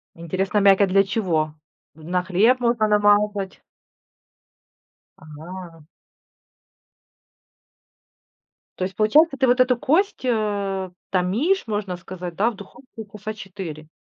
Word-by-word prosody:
Интересно, 190 +5 -1
мякоть 195 0 +5
для 195 +1 +4
чего? 175 -7 -1 0.4
На 175 +3 -2
хлеб 215 +8 +3
можно 235 -3 +1
намазать? 205 -1 +2 1.6
Ага. 165 +1 -11 2.9
То - - -2
есть, 185 0 -4
получается, 275 +7 +4
ты 265 - +2
вот 250 +1 +3
эту 255 0 +4
кость, 300 - 0
э, 205 -5 -1 0.2
томишь, 215 - +1
можно 205 -4 -3
сказать, 180 -1 -8
да, 220 +6 +2
в - - -12
духовке 220 +3 -12
часа 210 +1 -6
4? 185 -7 -8
200 Hz, 105 wpm, -22 LUFS, 185-225 Hz, 2.9 s, мякоть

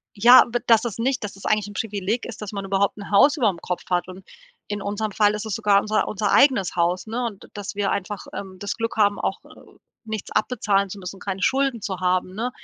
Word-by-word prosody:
ja, 240 +5 +8
b 240 - 0
dass 225 -2 +5
das 230 -3 -4
nicht 255 +3 0
dass 200 - -5
das 195 - -14
eigentlich 210 -1 +1
'n 205 - -10
Privileg 210 +2 -2
ist, 230 - -8
dass 210 - -6
man 200 -1 -4
überhaupt 195 +1 0
'n 200 - -9
Haus 275 +10 +5
überm 210 - +1
Kopf 180 - -4
hat 180 0 0
und 185 +1 -10 0.4
in 205 -1 -4
unserem 205 +1 -3
Fall 210 0 +3
ist 210 +1 -4
es 215 - -2
sogar 205 -3 +3
unser 215 +1 0
unser 205 -1 -1
eigenes 255 -12 +4
Haus, 175 +3 0
ne, 240 +3 -3
und 205 -4 -7
d - - -15
dass 205 -1 -6
wir 205 -1 0
einfach, 200 0 -4
ähm, 190 -1 -7
das 205 +1 -3
Glück 230 0 -3
haben, 205 -1 +3
auch, - - -2
äh, - - -17 0.6
nichts 220 -2 -5
abbezahlen 200 -5 +1
zu 200 +2 -8
müssen, 190 +1 -8
keine 195 -1 -4
Schulden 265 -3 +1
zu 190 -2 -4
haben, 185 0 0
ne? 235 +4 -2
205 Hz, 240 wpm, -23 LUFS, 195-225 Hz, 0.6 s, ja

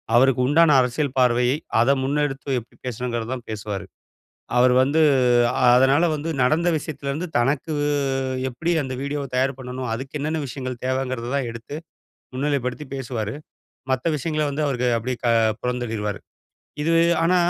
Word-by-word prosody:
அவருக்கு 130 +1 +4
உண்டான 150 0 +5
அரசியல் 125 +3 -1
பார்வையை, 125 +1 +3 0.2
அத 120 +4 +4
முன்னெடுத்து 140 -1 -1
எப்பிடி 115 - -18
பேசணுங்கிறதான் 120 0 -4
பேசுவாரு. 105 -3 -5 0.7
அவரு 125 0 +5
வந்து 150 +4 +2 0.7
அதனால 135 +5 +4
வந்து 150 +2 -4
நடந்த 165 +6 +2
விஷயத்துலேருந்து 150 +2 -4
தனக்கு 140 +5 0 0.8
எப்படி 160 +8 -3
அந்த 130 -1 -5
வீடியோவ 140 0 -3
தயார் 130 +1 +1
பண்ணணும், 125 0 -5
அதுக்கு 135 +4 -7
என்னென்ன 155 +2 -1
விஷயங்கள் 130 -1 -6
தேவங்கிறத 130 -2 -2
தான் 130 -4 -1
எடுத்து, 115 +5 -9 0.6
முன்னிலைப்படுத்தி 140 0 -1
பேசுவாரு. 115 -5 -4 0.6
மத்த 130 +5 -1
விஷயங்கள 155 +2 -1
வந்து 145 +2 -2
அவருக்கு 125 -2 0
அப்பிடியே 125 +1 -3
க - - +3 0.3
புறந்தள்ளிருவாரு. 115 -5 -2 0.6
இது 165 +2 +1 0.3
ஆனா, 180 +2 +3
130 Hz, 130 wpm, -23 LUFS, 125-145 Hz, 0.8 s, உண்டான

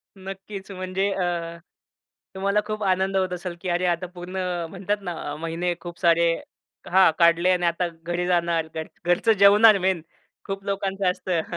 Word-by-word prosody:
नक्कीच, 195 +1 -8
म्हणजे 185 +1 -2
अ, 185 - -1 1.1
तुम्हाला 200 +2 +1
खूप 215 0 -4
आनंद 190 0 +1
होत 185 -1 0
असेल 180 0 -5
की 185 - -3
अरे 175 +1 0
आता 175 0 0
पूर्ण 180 +1 -7 0.3
म्हणतात 195 +3 -2
ना, 165 -5 -5
महिने 165 +3 -2
खूप 175 -1 -9
सारे 170 -1 +4 0.6
हा 190 0 +6
काढले 170 +1 +4
आणि 180 -1 +1
आता 170 +1 +1 0.2
घरी 175 +1 -2
जाणार. 170 -2 +1
घर 160 0 -4 0.2
घरचं 175 +6 +3
जेवणार 205 +2 +7
मेन 190 -3 +1 0.5
खूप 195 0 -4
लोकांचं 195 -1 -1
असतं. 180 -2 -2
185 Hz, 155 wpm, -24 LUFS, 175-195 Hz, 1.1 s, जेवणार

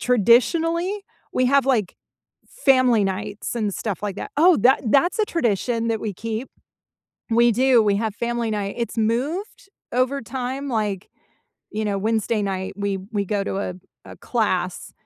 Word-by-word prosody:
traditionally, 330 - +2 0.3
we 255 - +2
have, 275 0 +3
like, 225 -9 +1 0.5
family 255 - +3
nights, 205 +3 -4
and 210 -4 -1
stuff 210 -3 -4
like 205 -2 -3
that - - -6
oh, 345 +2 +6
that 255 +5 +4
that's 315 - +3
a 430 - +3
tradition 230 - 0
that 225 -1 -1
we 215 -2 -3
keep. 225 +5 -4 0.8
We 235 +1 +4
do, 250 0 +4
we 205 -2 +2
have 220 0 -2
family 235 0 -2
night. 205 -2 -2
It's 235 0 -3
moved 280 - -2 0.2
over 255 +3 +1
time, 260 +4 -4
like, 210 -6 -2 0.6
you 215 +1 -3
know, 200 -1 -1
Wednesday 220 0 0
night- 190 -1 -3
we 200 -1 -2
we 205 -1 0
go 200 +1 -1
to 195 - -3
a 190 -2 -3 0.3
a - - -11
class 185 -6 -1
230 Hz, 160 wpm, -22 LUFS, 205-260 Hz, 0.8 s, oh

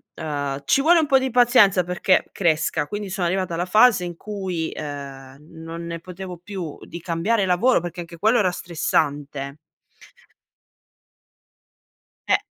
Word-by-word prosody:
ehm, 145 -3 -4
ci 275 - +3
vuole 340 +5 +5
un 315 - +2
po' 275 -2 +4
di 260 0 -1
pazienza 240 -6 +5
perché 180 +2 +1
cresca, 160 -4 0
quindi 205 -2 -5
sono 185 -3 -1
arrivata 185 0 -1
alla 170 +1 -1
fase 215 -1 +5
in 175 -1 -5
cui, 190 -6 -4
ehm, 140 -2 -8 0.2
non 165 +1 -7
ne 170 0 -5
potevo 180 0 -9
più 180 -6 -6
di 170 - -8
cambiare 190 +5 0
lavoro 185 +5 +3
perché 175 0 -7
anche 170 0 -8
quello 220 +8 +3
era 185 -3 +3
stressante. 145 -5 -2 2.7
Eh. - - +4
175 Hz, 145 wpm, -22 LUFS, 160-200 Hz, 2.7 s, vuole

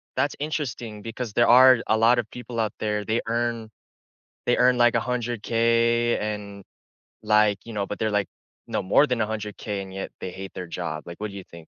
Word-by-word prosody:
that's 135 +2 0
interesting 125 -8 -4
because 115 0 -6
there 120 +2 +4
are 130 +1 +8
a 110 - +3
lotta 120 +2 +4
people 120 0 -7
out 110 -2 0
there, 105 -1 -1
they 110 +3 0
earn 115 -1 -1 0.8
they 125 - +3
earn 125 0 +4
like 120 0 +4
$100,000.00, 115 0 +1
and, 105 -2 -5 0.6
like, 105 -1 +4
you 115 - -9
know, 105 -2 -1
but 105 - -6
they're 110 - 0
like 105 -1 0 0.4
no - - -2
more 100 +10 +4
than 125 -4 -1
$100,000.00 105 -1 -3
and 95 -1 -10
yet 95 0 -5
they 95 - -4
hate 95 +1 -9
their 90 - -6
job, 85 -2 -5
like, 85 +2 -9
what 105 0 -3
do 100 - -10
you 95 - -8
think? 85 - -13
110 Hz, 195 wpm, -25 LUFS, 105-120 Hz, 0.8 s, are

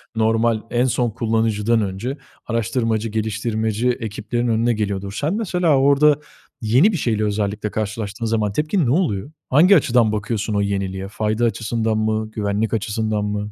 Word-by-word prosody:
normal, 110 0 +2
en 120 +1 +2
son 125 -1 +1
kullanıcıdan 110 -1 +1
önce 105 +8 -3 0.3
araştırmacı, 115 -1 -1
geliştirmeci 110 +1 -1
ekiplerin 120 0 -2
önüne 115 +1 +2
geliyordur. 100 -2 -3
Sen 155 +6 0
mesela 180 -8 +1
orada, 140 +2 +4 0.4
yeni 125 - +4
bir 185 - -1
şeyle 105 -4 -1
karşılaştığında 110 +1 -3
zaman 110 -2 0
tepkin 155 - +1
ne 120 - +1
oluyor? 135 - 0 0.2
Hangi 170 +9 +6
açıdan 120 - +3
bakıyorsun 105 0 -2
o 100 - +1
yeniliğe? 95 -1 -2
Fayda 110 +3 -1
açısından 115 -1 -1
mı? 110 0 -1
Güvenlik 105 +1 -1
açısından 110 -1 -1
mı? 105 0 -3
110 Hz, 140 wpm, -21 LUFS, 105-120 Hz, 0.4 s, Hangi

